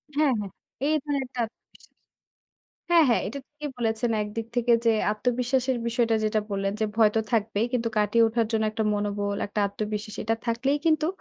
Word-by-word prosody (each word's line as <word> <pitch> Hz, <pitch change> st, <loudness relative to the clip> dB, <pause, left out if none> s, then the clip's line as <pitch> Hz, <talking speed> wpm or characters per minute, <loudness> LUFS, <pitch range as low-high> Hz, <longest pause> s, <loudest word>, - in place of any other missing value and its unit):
হ্যাঁ, 300 Hz, -2 st, +3 dB
হ্যাঁ। 200 Hz, -3 st, -5 dB, 0.4 s
এই 310 Hz, -, +3 dB
ধরনের 285 Hz, -2 st, -1 dB
একটা 250 Hz, -1 st, -4 dB, 0.3 s
বিশ্বাস -, -, -20 dB, 1.0 s
হ্যাঁ, 335 Hz, -2 st, +7 dB
হ্যাঁ, 235 Hz, -, +3 dB
এটা 280 Hz, -, -5 dB
ঠিকই 300 Hz, 0 st, -7 dB
বলেছেন 230 Hz, 0 st, 0 dB
একদিক 215 Hz, +2 st, -5 dB
থেকে 240 Hz, 0 st, +3 dB
যে 230 Hz, -, +7 dB, 0.2 s
আত্মবিশ্বাসের 250 Hz, +3 st, 0 dB
বিষয়টা 235 Hz, -1 st, +2 dB
যেটা 215 Hz, 0 st, +1 dB
বললেন 195 Hz, 0 st, -1 dB
যে, -, -, +3 dB
ভয় 220 Hz, -2 st, +6 dB
তো -, -, +4 dB
থাকবেই 220 Hz, 0 st, +1 dB
কিন্তু 235 Hz, -2 st, 0 dB
কাটিয়ে 225 Hz, +2 st, +4 dB
ওঠার 230 Hz, 0 st, 0 dB
জন্য 220 Hz, 0 st, +1 dB
একটা 220 Hz, 0 st, -2 dB
মনোবল, 205 Hz, 0 st, -1 dB
একটা 205 Hz, +1 st, -2 dB
আত্মবিশ্বাস 210 Hz, +1 st, -4 dB
এটা 225 Hz, +1 st, +1 dB
থাকলেই 260 Hz, +5 st, +1 dB
কিন্তু 310 Hz, -1 st, +3 dB
230 Hz, 175 wpm, -26 LUFS, 210-250 Hz, 1.0 s, হ্যাঁ